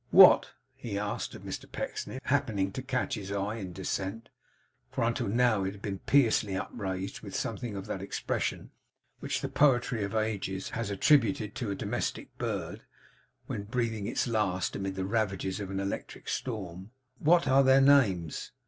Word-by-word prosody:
'What,' - - +8 0.2
he 105 -4 -5
asked 105 0 -3
of - - -11
Mr - - -6
Pecksniff, 130 - -5
happening 110 -9 +1
to 130 - -5
catch 130 -1 -1
his 100 -1 -4
eye 100 +2 -2
in 100 -4 -5
its 90 - -10
descent; 95 +4 -3 0.6
for - - -1
until 115 -2 0
now 115 -1 +3
it 95 +1 -2
had 100 - -13
been 100 -3 -3
piously 115 -7 +3
upraised, 95 -2 -4
with - - -8
something 115 -4 -3
of 95 -1 -5
that 95 -3 -4
expression 100 - -3 0.5
which - - -2
the - - -1
poetry 125 -6 +3
of 100 +2 -3
ages 100 -3 -1
has 115 -2 -3
attributed 110 -2 +3
to 120 - -3
a 100 - -1
domestic - - -3
bird, - - -3 0.6
when - - -4
breathing 110 -1 -2
its - - 0
last 100 -7 0
amid 95 -1 -3
the 95 0 -2
ravages 100 -2 -1
of 100 -2 -5
an 95 0 -2
electric 100 0 -5
storm: 95 -5 -4 0.3
'What 165 -1 +4
are 135 +1 +6
their 135 0 +6
names? 115 - +3
105 Hz, 170 wpm, -30 LUFS, 95-120 Hz, 0.6 s, What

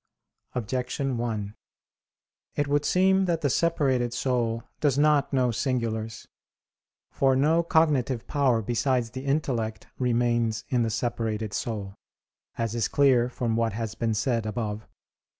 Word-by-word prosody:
Objection 125 +3 -2
1: 110 -4 -3 1.0
It 145 - 0
would 145 +1 +1
seem 190 +2 +3
that 170 -3 0
the 145 -4 +1
separated 130 -7 +1
soul 120 -3 0 0.2
does 140 -3 +2
not 150 -1 +3
know 130 -3 +2
singulars. 110 -3 -2 0.8
For 135 -1 +2
no 155 +5 +3
cognitive 145 -8 +1
power 130 -6 +1
besides 120 +1 0
the 130 +1 -7
intellect 125 -7 -1
remains 120 -3 +1
in 125 -2 +2
the 115 - +1
separated 110 -2 -2
soul, 100 -3 -3 0.6
as 115 -1 -1
is 115 -2 0
clear 130 -4 +3
from 120 -2 -2
what 115 -1 +1
has 110 0 -3
been 115 -1 -1
said 115 0 0
above 105 -1 -3
(Q. 110 - -22
120 Hz, 135 wpm, -26 LUFS, 115-140 Hz, 1.0 s, seem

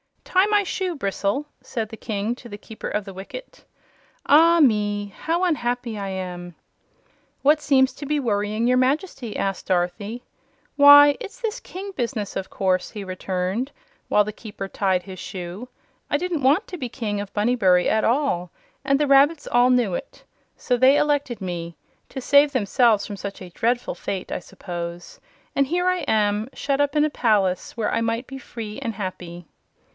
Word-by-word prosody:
"Tie 375 +2 +3
my 415 -1 +3
shoe, 370 -2 -2
Bristle," 200 +2 -1 0.2
said 225 -4 -4
the 225 - -9
King 215 +1 -2
to 240 -1 -13
the 205 - -7
Keeper 215 +1 -8
of 210 -1 -2
the 195 - -8
Wicket. 200 - -10 0.6
"Ah 330 +3 +6
me! 205 -6 +2
how 335 +3 -1
unhappy 245 - -1
I 200 - -4
am!" 180 -2 -6 0.9
"What 300 +2 +4
seems 265 -2 +3
to 285 - -8
be 300 +1 +1
worrying 215 -2 -1
your 250 +1 +3
Majesty?" 260 - -1
asked 195 -1 -2
Dorothy. 190 +6 -1 0.5
"Why, 285 0 +9
it's 465 +1 -9
this 455 -1 -3
king 390 +2 -8
business, 235 - -3
of 190 - -4
course," 185 -2 0
he 210 -2 -7
returned, 185 +6 -3 0.4
while 210 - +4
the 210 - -5
Keeper 205 -3 -7
tied 190 -3 0
his 190 -2 -9
shoe. 185 +7 -7 0.4
"I - - +2
didn't 345 -1 -2
want 290 +11 +3
to 360 - -7
be 255 -6 -4
King 210 -3 -3
of 205 - -8
Bunnybury 205 -5 +3
at 220 - +2
all, 230 -9 +1 0.3
and 275 - +2
the 295 - +2
rabbits 280 +3 +4
all 245 +1 +5
knew 245 -7 +2
it. - - -6 0.3
So 245 - 0
they 260 +3 +5
elected 285 -6 0
me 170 -2 -5 0.3
to 265 - -6
save 285 +3 +5
themselves 225 -2 +3
from 205 -2 -7
such 200 0 -6
a 185 - -8
dreadful 240 +6 0
fate, 190 -2 -5
I - - -2
suppose 175 -1 -7 0.4
and 275 -1 +2
here 355 +4 0
I 365 0 +2
am, 210 +1 +1
shut 275 +1 -1
up 285 0 0
in 300 0 +4
a 305 - -1
palace, 205 -6 +1
when 220 -2 0
I - - 0
might 230 +2 -1
be 270 +1 -8
free 220 -4 -7
and 225 -2 -4
happy." 180 -3 -6
230 Hz, 180 wpm, -23 LUFS, 195-285 Hz, 0.9 s, Why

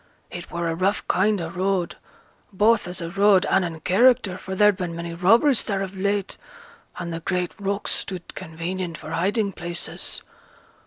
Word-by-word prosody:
It 175 -1 -8
were 170 0 -3
a 165 - 0
rough 190 +5 0
kind 205 +2 +2
o' 165 -1 -4
road, 185 -1 -1 0.6
both 210 0 +3
as 180 0 -4
a 170 0 -5
road 195 0 +4
and 190 - +2
in 165 -2 -5
character, 200 +1 +3
for 190 +1 -6
there'd 210 0 +5
been 180 -3 -4
many 170 0 -5
robberies 225 - +4
there 195 -2 -2
of 195 0 -7
late, 200 0 -2 0.6
and 170 -1 -4
th' 165 0 -6
great 180 -1 -1
rocks 200 +1 -2
stood 180 -3 -2
convenient 170 0 -5
for 155 - -9
hiding 200 +5 0
places. 175 -1 -2
185 Hz, 170 wpm, -24 LUFS, 170-200 Hz, 0.6 s, there'd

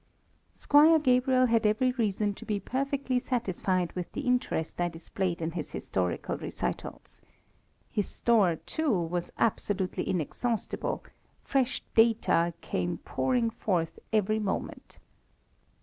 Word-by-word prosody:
Squire 305 +3 +6
Gabriel 255 -2 +3
had 230 -2 +2
every 215 +4 +3
reason 210 -4 0
to - - -11
be 210 -2 -1
perfectly 265 +3 -1
satisfied 190 -8 -1
with 180 -1 -5
the - - -3
interest 250 - -1
I 175 - +2
displayed 170 +1 -3
in 160 - -1
his 165 -2 -5
historical 90 -2 -2
recitals. - - -5 0.7
His 205 - 0
store, 210 -8 +3
too, 315 - -2
was 175 -3 -1
absolutely 200 -4 0
inexhaustible, 215 - -2 0.4
fresh 265 -1 0
data 215 -7 +3
came 90 -1 -2
pouring 245 -3 0
forth 170 -7 -1
every 215 0 +2
moment. 205 -3 -4
215 Hz, 120 wpm, -29 LUFS, 175-250 Hz, 0.7 s, Squire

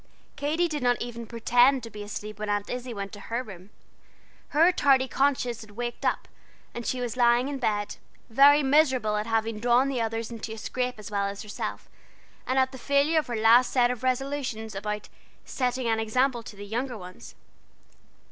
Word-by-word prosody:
Katy 310 +5 0
did 300 -3 -4
not 245 -1 +2
even 235 -1 -6
pretend 245 +3 +3
to 230 - -8
be 210 - -8
asleep 210 0 -7
when 215 0 -3
Aunt 205 0 -1
Izzie 250 0 -4
went 200 -3 -5
to 205 - -10
her 235 +4 -3
room. 190 -4 -12 0.8
Her 330 +4 +4
tardy 270 -6 +3
conscience 250 -3 0
had 215 - -12
waked 240 0 -4
up, - - 0 0.5
and 235 -1 -6
she 255 - -1
was 245 -1 -3
lying 240 +1 +3
in 280 -1 -4
bed, 210 -4 -1 0.3
very 285 +5 +6
miserable 265 -6 +3
at 210 +1 -2
having 225 -1 0
drawn 245 +4 +3
the 255 -3 -1
others 225 0 -3
into 225 -1 -6
a - - -8
scrape 250 +2 -3
as 215 +1 -9
well 200 -1 0
as 200 +2 -6
herself, 210 - -5 0.6
and 260 - 0
at 260 0 +3
the 260 - -9
failure 285 +5 +2
of 310 - -4
her 240 - -3
last 225 +3 +5
set 245 -2 +3
of 250 - -5
resolutions 255 -4 -2
about 210 +1 -4 0.4
"setting 255 -1 -1
an 225 -1 +1
example 245 +3 +1
to 220 - -11
the 205 0 -9
younger 240 +4 -3
ones." 180 -2 -11
240 Hz, 195 wpm, -27 LUFS, 220-260 Hz, 0.8 s, very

